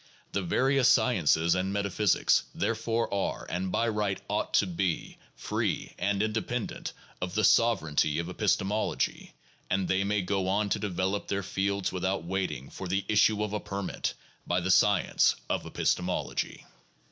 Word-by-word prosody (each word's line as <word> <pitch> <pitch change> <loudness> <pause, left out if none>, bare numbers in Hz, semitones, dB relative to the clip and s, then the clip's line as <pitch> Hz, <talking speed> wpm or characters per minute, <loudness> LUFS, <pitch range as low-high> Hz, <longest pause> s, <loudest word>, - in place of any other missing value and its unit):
The 100 - -1
various 130 +7 +3
sciences 85 - +3
and 95 +1 -1
metaphysics, 100 0 +2
therefore, 115 0 -1
are 100 -1 -2
and 90 +1 -2
by 115 +5 +1
right 105 -3 -1
ought - - -1
to - - +5
be, 90 -1 -2 0.2
free - - -2
and 100 0 +1
independent 110 +2 -3 0.3
of 90 +1 -3
the 110 - +2
sovereignty 80 -10 +3
of 85 0 -2
epistemology, 100 +2 -1 0.3
and 95 0 0
they 95 +1 +2
may 100 0 0
go 95 0 -1
on 100 +2 +1
to - - 0
develop 95 0 -2
their 100 0 -1
fields 100 0 -1
without 95 0 -1
waiting 85 -7 -3
for 95 - -6
the 95 +2 -1
issue 105 0 +3
of 105 -1 -3
a 105 - 0
permit 100 -1 -3 0.3
by 90 - +2
the 90 +1 0
science 105 +2 +4
of - - -2
epistemology. 90 0 -1
100 Hz, 150 wpm, -29 LUFS, 90-105 Hz, 0.3 s, to